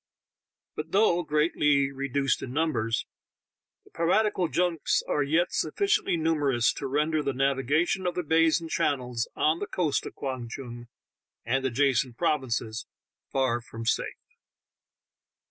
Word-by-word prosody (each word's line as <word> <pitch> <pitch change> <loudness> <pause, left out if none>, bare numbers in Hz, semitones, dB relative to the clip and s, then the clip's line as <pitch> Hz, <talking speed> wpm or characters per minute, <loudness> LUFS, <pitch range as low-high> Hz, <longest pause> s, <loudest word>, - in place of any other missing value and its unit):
But 155 +1 -6
though 195 -4 +4
greatly 150 -3 +2
reduced 140 0 -1
in 125 - -6
numbers, 130 -7 0 0.8
the - - -21
piratical 185 +2 +1
junks 175 -1 +1
are 150 - +1
yet 160 +6 +1
sufficiently 400 - +1
numerous 145 -7 +2
to 140 - -5
render 150 +3 +1
the 140 -2 -1
navigation 140 +7 +1
of 175 - -2
the 180 - -1
bays 160 +1 +3
and 165 - -7
channels 125 -6 -1
on 155 +2 +2
the 205 - -3
coast 165 -6 -1
of - - -10
Kwang 130 -4 -4
Tung 120 -1 -8 0.6
and 130 +3 0
adjacent 130 -1 +1
provinces 120 -8 -1 0.4
far 130 -3 +1
from 115 -2 -8
safe. 115 - -1
145 Hz, 130 wpm, -27 LUFS, 130-165 Hz, 0.8 s, though